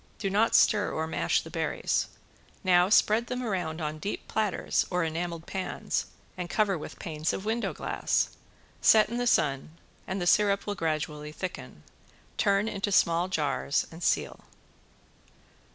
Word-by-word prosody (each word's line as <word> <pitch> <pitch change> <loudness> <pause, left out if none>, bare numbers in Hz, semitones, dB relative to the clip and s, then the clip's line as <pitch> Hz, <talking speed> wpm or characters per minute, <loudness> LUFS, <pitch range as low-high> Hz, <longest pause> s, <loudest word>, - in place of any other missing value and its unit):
Do 195 -2 -2
not 215 +3 +3
stir 205 -1 +4
or 160 - -2
mash 160 - 0
the - - -11
berries. - - -1 0.6
Now 180 -1 +4
spread 220 +2 +4
them 250 0 -3
around 180 -8 -2
on 155 0 -3
deep 200 +7 -5
platters 215 -3 0
or 180 -1 0
enameled 165 +1 -3
pans 190 -1 -3 0.3
and 180 -1 -5
cover 205 -1 +2
with 155 - -8
panes 155 -1 -2
of 190 - -5
window 225 +2 -1
glass. - - 0 0.5
Set 215 -1 +6
in 235 - -3
the 245 0 0
sun, 150 - +1 0.3
and 190 +2 -2
the 175 - -2
syrup 200 +2 +3
will 205 - -2
gradually 155 -3 -3
thicken. 185 +4 -7 0.6
Turn 200 0 +2
into 205 -1 -2
small 170 -1 +3
jars 150 -5 0
and 165 +1 -11
seal. - - 0
185 Hz, 150 wpm, -28 LUFS, 160-205 Hz, 0.6 s, Set